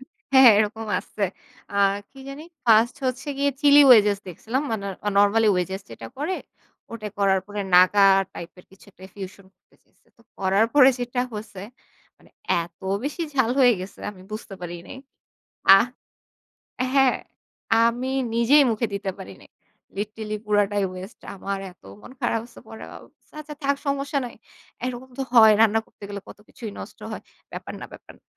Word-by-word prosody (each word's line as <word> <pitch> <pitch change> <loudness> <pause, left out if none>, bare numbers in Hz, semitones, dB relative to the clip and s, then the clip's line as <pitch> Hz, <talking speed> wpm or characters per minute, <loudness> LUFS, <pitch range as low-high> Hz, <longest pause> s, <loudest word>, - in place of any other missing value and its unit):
হ্যাঁ, 265 -1 +1
হ্যাঁ, 230 - +10
এরকম 220 +1 -1
আছে। 205 0 -4 0.5
অ্যা 200 - 0 0.3
কি 270 - -15
জানি? 280 +3 -8 0.2
1st 230 +2 +4
হচ্ছে 255 +3 -3
গিয়ে 280 0 +2
চিলি 290 0 +7
ওয়েজেস 210 -5 +6
দেখছিলাম। 230 - -3
মানে 210 -3 -3 0.2
অ - - +3
নরমালি 210 +2 +4
ওয়েজেস 185 +2 -2
যেটা - - -9
করে, 330 +6 -2 0.6
ওটা 215 -2 -6
করার 195 -1 +3
পরে 205 0 -5
নাগা 190 +2 +6 0.3
টাইপ 170 - -8
এর 180 - -15
কিছু 195 - -19
একটা 185 - -16
ফিউশন 190 -1 -9
করতে 180 - -32
চাইসে। - - -36
তো 230 - -24 0.2
করার 195 +3 +2
পরে 275 -3 +8
যেটা 245 0 -2
হচ্ছে 210 -3 -8 0.6
মানে, - - -23 0.3
এত 170 +1 -19 0.2
বেশি 300 +4 -3
ঝাল 260 -4 +2
হয়ে 250 -2 +6
গেছে, 185 +2 -9
আমি 185 -3 -15
বুঝতে 215 -2 -7
পারি 175 -1 -6
নাই। 265 - -9 0.8
আ - - +6 1.2
হ্যাঁ, 270 -2 +4 0.7
আমি 245 +3 -1 0.2
নিজেই 260 +6 +5
মুখে 225 +2 -1
দিতে 200 -1 -3
পারি 95 - -9
নাই। - - -19 0.5
লিটারেলি 215 +1 -4
পুরাটাই 205 -1 +1
ওয়েস্ট। 185 +3 -10
আমার 195 +1 -4
এত - - -33 0.2
মন 255 - -13
খারাপ 225 - 0
হচ্ছে। 240 - -15
পরে 225 - -10
ভাব - - -11 0.4
"আচ্ছা 300 0 -8
থাক 280 0 +1
সমস্যা 280 +1 -1
নাই। - - -10 0.5
এরকম 255 +1 -5
তো - - 0
হয়, 220 -2 +8
রান্না 225 0 +4
করতে - - -29
গেলে 200 -1 -6
কত - - -12
কিছুই 225 -3 -8
নষ্ট - - -10
হয়। - - -7 0.3
ব্যাপার - - -7
না, - - -7
ব্যাপার - - -13
না" - - -42
220 Hz, 170 wpm, -23 LUFS, 200-255 Hz, 1.2 s, হ্যাঁ